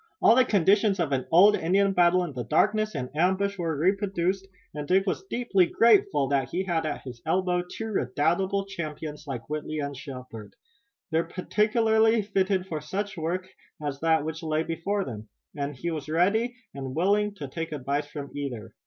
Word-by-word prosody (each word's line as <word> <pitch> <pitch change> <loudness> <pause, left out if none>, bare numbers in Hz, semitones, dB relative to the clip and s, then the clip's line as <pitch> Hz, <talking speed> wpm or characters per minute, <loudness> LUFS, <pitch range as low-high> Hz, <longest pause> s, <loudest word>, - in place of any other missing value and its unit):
All - - +6
the 255 - +6
conditions 200 -1 +3
of 160 -4 0
an 130 -2 -1
old 200 +5 +7
Indian 195 +4 +2
battle 180 0 +4
in 165 -5 -5
darkness 215 - +2
and 130 0 -5
ambush 190 +4 +1
were 165 -3 -1
reproduced, 190 +2 0 0.3
and 150 -1 -5
Dick 190 +1 +3
was 215 - -2
deeply 200 -7 +2
grateful 200 -12 +4
that 140 -2 +1
he 185 - -1
had 165 -4 -1
at 150 - -4
his 125 -3 -9
elbow 180 -1 +1
two 180 +5 -7
redoubtable 185 +6 0
champions 155 -5 -6
like 120 -4 -5
Whitley 155 +1 -4
and 140 -1 -3
Shepard. 125 -5 -9 0.6
They 160 +1 +3
were - - -8
peculiarly 220 +3 +2
fitted 195 -2 0
for 160 -5 -4
such 195 +7 -4
work 175 +3 -3 0.3
as 145 -2 -4
that 160 -1 +2
which 160 0 -4
lay 155 -1 0
before 185 +5 -2
them, 110 -3 -8 0.3
and 145 0 -3
he 170 +7 -3
was 155 -2 -5
ready 210 +9 +2 0.2
and 135 -1 -6
willing 205 +4 +2
to 150 -8 -6
take 165 +4 -5
advice 145 +1 -2
from 145 -2 -7
either. 135 -6 -5
170 Hz, 180 wpm, -27 LUFS, 145-195 Hz, 0.6 s, old